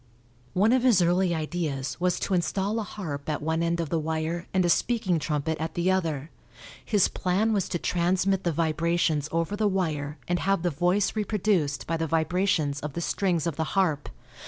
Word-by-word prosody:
One 210 +6 +4
of 260 - +3
his 235 -8 +4
early 175 0 +2
ideas 150 -5 -3
was 180 -1 +1
to 195 - -1
install 190 +5 0
a - - -2
harp 155 -8 -6
at 150 - -1
one 160 +2 -1
end 170 0 0
of 165 -3 -2
the 165 - 0
wire 160 +2 -2
and 185 -1 +2
a - - +3
speaking 185 -2 +1
trumpet 150 +1 -2
at 160 0 -4
the 175 +2 +2
other. 160 -5 -1 0.5
His 205 -4 +3
plan 200 +5 0
was 200 -4 0
to - - -1
transmit 185 +3 +1
the 175 - +1
vibrations 160 -1 0
over 165 +4 -1
the 210 0 +1
wire 155 -6 -1
and 175 0 0
have 195 -2 +1
the 175 - +1
voice 180 +8 +1
reproduced 200 -9 0
by 165 - -1
the 160 0 -1
vibrations 160 -2 +1
of 150 -1 -5
the 170 - -3
strings 175 -3 0
of 165 -4 -2
the 160 - +1
harp. 160 -7 +1
170 Hz, 195 wpm, -27 LUFS, 155-190 Hz, 0.5 s, One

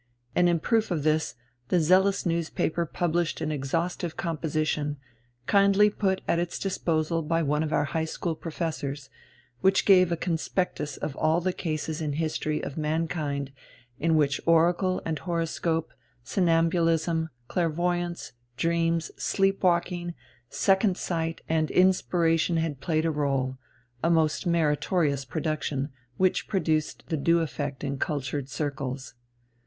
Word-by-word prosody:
And 175 0 +4
in 170 -1 +2
proof 225 +5 +1
of 165 -6 -1
this 155 +1 +1 0.3
the 180 - +3
zealous 190 +5 +3
newspaper 170 0 0
published 170 0 -1
an 155 - -2
exhaustive 165 +4 -2
composition, 155 -3 -1 0.5
kindly 200 +3 +5
put 190 -2 0
at 170 - +2
its 175 0 -2
disposal 165 -4 0
by 165 +1 0
one 150 +1 +1
of 155 -1 -2
our 145 - +2
high 160 +4 -1
school 165 +1 -3
professors, 155 -4 -4 0.5
which 190 +5 +3
gave 185 -3 +6
a 170 - +1
conspectus 160 -3 -2
of 140 - -4
all 160 +2 +2
the 185 +1 -1
cases 155 -2 -3
in 155 - -1
the 145 - -3
history 155 -1 -1
of 145 - -5
mankind 150 -3 -1 0.5
in 165 0 +2
which 145 -2 +2
oracle 175 +3 +3
and 160 -2 -2
horoscope, 165 -1 -1 0.3
somnambulism, 165 -1 +2 0.2
clairvoyance, 175 +2 -1 0.3
dreams, 165 +2 +1
sleep 195 0 +1
walking, 175 -1 +1 0.3
second 195 +2 +2
sight, 165 -2 -2
and 160 -1 +1
inspiration 175 -2 +3
had 160 -4 -2
played 155 0 0
a 165 - +2
rôle, 135 -3 -1 0.4
a 165 - +3
most 160 0 +2
meritorious 150 -3 +1
production, 150 -1 -2 0.3
which 185 -1 +2
produced 155 -6 0
the 160 - 0
due 170 +4 +3
effect 145 -2 -4
in 140 -1 -3
cultured 140 -1 -2
circles. 135 -3 -4
165 Hz, 135 wpm, -27 LUFS, 150-175 Hz, 0.5 s, gave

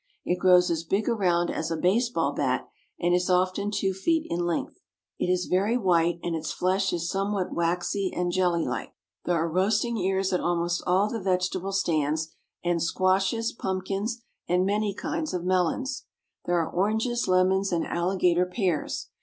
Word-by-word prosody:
It 180 +1 0
grows 180 -1 +5
as 165 -1 -1
big 195 +5 -1
around 180 -7 +1
as 160 - -3
a 165 - -2
baseball 230 +9 +1
bat, - - -1 0.3
and 175 0 +2
is 180 +1 +1
often 185 +2 +1
two 195 -2 0
feet 320 - 0
in 175 +1 0
length. 170 - -3 0.4
It - - 0
is 180 0 +1
very 200 +6 +1
white, 175 -5 +2
and 170 -1 -1
its 160 - -3
flesh 190 +1 0
is 170 -1 -2
somewhat 195 0 -1
waxy 180 +3 -1
and 175 0 -1
jelly 175 -2 +1
like. 125 -4 -4 0.3
There 175 - +1
are 165 0 +1
roasting 210 +7 +1
ears 190 0 0
at 180 - +2
almost 175 0 0
all 185 +3 +3
the 225 0 -4
vegetable 185 0 -1
stands, 160 -4 0 0.3
and 175 -1 0
squashes, 190 +6 +1
pumpkins, 195 +3 -3 0.2
and 180 +1 +2
many 205 0 0
kinds 310 - -3
of 175 -1 -3
melons. 185 - 0 0.4
There 175 0 +1
are 165 - 0
oranges, 220 +6 0
lemons, 185 +2 +2
and 170 -2 0
alligator 180 0 +1
pears. 180 -5 -2
185 Hz, 170 wpm, -26 LUFS, 175-200 Hz, 0.4 s, grows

